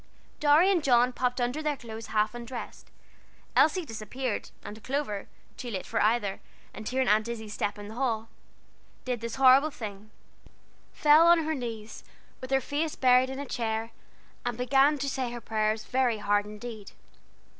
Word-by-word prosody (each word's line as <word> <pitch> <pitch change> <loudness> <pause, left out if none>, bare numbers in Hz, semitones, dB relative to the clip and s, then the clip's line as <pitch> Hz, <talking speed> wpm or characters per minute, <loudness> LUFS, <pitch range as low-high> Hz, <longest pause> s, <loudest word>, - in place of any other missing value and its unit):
Dorry 305 +6 +5
and 350 -5 +1
John 250 -2 +4
popped 250 0 -1
under 245 +5 -1
the 300 -2 -1
clothes 225 -2 -8
half 215 +1 +1
undressed, 240 0 -8 0.7
Elsie 340 +3 +4
disappeared, 225 +1 -4
and 215 +1 -9
Clover, 260 -7 -3 0.3
too 245 - -6
late 190 -5 -4
for 225 - -1
either, 210 -2 +1 0.3
and 215 - -6
hearing 260 0 0
Aunt 215 +2 +3
Izzie's 220 -3 -6
step 205 -1 -2
in 205 0 -8
the 215 - -9
hall, 230 -3 -1 0.8
did 250 -3 -2
this 230 0 -4
horrible 270 +3 +6
thing 215 -6 -8 0.8
fell 305 +2 +5
on 340 -1 +6
her 315 - 0
knees, 230 -5 -6 0.4
with 255 - -7
her 270 0 +2
face 300 +4 -2
buried 255 0 +4
in 265 - -5
a 285 - -4
chair, 225 -2 -3 0.5
and 245 -2 -3
began 270 +4 +3
to 275 0 -3
say 260 -3 -2
her 240 - -6
prayers 215 -1 -1
very 250 -2 +1
hard 205 0 +1
indeed. 210 -1 -9
245 Hz, 165 wpm, -28 LUFS, 220-270 Hz, 0.8 s, horrible